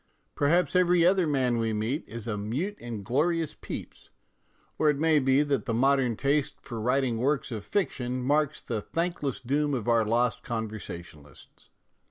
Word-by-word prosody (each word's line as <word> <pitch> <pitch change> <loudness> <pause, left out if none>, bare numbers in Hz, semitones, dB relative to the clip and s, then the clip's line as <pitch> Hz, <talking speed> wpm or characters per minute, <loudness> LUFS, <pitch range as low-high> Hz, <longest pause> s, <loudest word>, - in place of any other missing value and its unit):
Perhaps 170 +6 +2
every 175 -2 +4
other 185 -1 +4
man 130 -5 +1
we 115 -1 0
meet 110 +8 -1
is 115 0 -7
a 110 - -1
mute 125 - -3
and 115 -5 -6
glorious 160 - +1
Pepys, - - -8 0.7
or 155 - +4
it 145 - +2
may 155 0 +3
be 135 +1 +3
that 145 -2 -1
the 115 -4 -1
modern 130 -1 +3
taste 140 +4 0
for 115 -4 -7
writing 125 0 +1
works 135 0 0
of 110 -3 -4
fiction 130 - -2
marks 150 +2 +1
the 110 -3 -3
thankless 165 - -2
doom 145 +3 0
of 120 -4 -4
our 115 -1 +4
lost 120 +3 +1
conversationalists. 90 - -7
130 Hz, 165 wpm, -28 LUFS, 115-150 Hz, 0.7 s, every